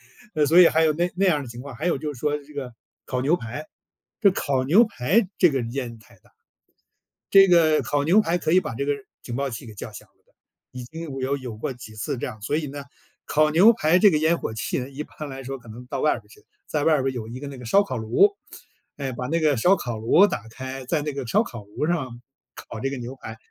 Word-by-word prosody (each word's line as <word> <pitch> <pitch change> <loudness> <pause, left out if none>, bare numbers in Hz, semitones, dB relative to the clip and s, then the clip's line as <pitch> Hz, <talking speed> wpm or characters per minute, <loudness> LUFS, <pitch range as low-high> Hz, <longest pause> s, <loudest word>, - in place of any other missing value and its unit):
是 - - -21
烟， 210 - -28
呃， 150 -1 +3
所 170 +3 +6
以 175 - +9
还 160 - +2
有 155 -1 +3
那 175 +3 0
那 195 +1 +2
样 160 -5 +3
儿 - - -5
的 - - -9
情 120 +1 -9
况， 135 -3 -9
还 155 - -5
有 170 - +1
就 150 -1 -3
是 120 - -13
说 150 -1 0
这 145 +1 -17
个 130 -4 -6 0.3
烤 125 -1 -2
牛 150 +6 +3
排， 125 +7 -7 0.6
这 200 -3 +6
烤 135 -7 -1
牛 185 - +6
排 185 - +1
这 180 - +5
个 135 -2 0
烟 120 -4 -5
太 110 - -20
大。 - - -26 1.0
这 195 -1 +8
个 160 -3 +4
烤 145 -1 0
牛 190 +7 +5
排 175 -3 +1
可 155 - -1
以 185 - +6
把 115 - -5
这 140 +4 -3
个 145 - +2 0.3
警 120 - -6
报 140 -1 -2
器 115 +2 -7
给 110 - -11
叫 - - -7
响 - - -12
了 - - -40
的， - - -35 0.4
已 125 -1 -7
经 165 +6 -8 0.2
有 135 +2 -1
有 125 -5 -7
过 110 - -4
几 115 -3 -12
次 130 +5 -4
这 - - -3
样， 110 -1 -8
所 145 +8 -1
以 155 - -2
呢， 140 0 -7 0.4
烤 155 0 +2
牛 190 +9 +7
排 180 -5 +2
这 210 - +7
个 155 - +2
烟 160 +2 +3
火 - - -4
气 115 - -2
呢， 130 +2 -6
一 140 +2 -6
般 150 -1 -9
来 135 0 -7
说 135 0 -6
可 115 - -16
能 120 +3 -10
到 - - -4
外 150 - +3
边 115 - -7
儿 - - -25
去， 110 - -19 0.2
在 150 -2 -2
外 160 - +4
边 130 - -2
儿 135 - +1
有 115 -3 -6
一 125 +3 -7
个 145 - -7
那 140 - -7
个 125 - -9
烧 200 - +4
烤 130 -10 -4
炉， 115 - +3 0.7
哎， 135 -2 -3
把 125 +1 -5
那 165 +3 0
个 150 -3 +3
烧 180 +12 +4
烤 120 - -5
炉 145 - +5
打 115 - -4
开， 130 +2 -7
在 150 +2 -1
那 150 -1 -3
个 135 -4 -5
烧 - - +3
烤 115 -4 -9
炉 105 +8 -3
上 130 -8 -2 0.4
烤 110 - -9
这 135 - -1
个 140 - -5
牛 125 +2 -7
排， 110 -3 -9
140 Hz, 295 characters per minute, -24 LUFS, 125-160 Hz, 1.0 s, 以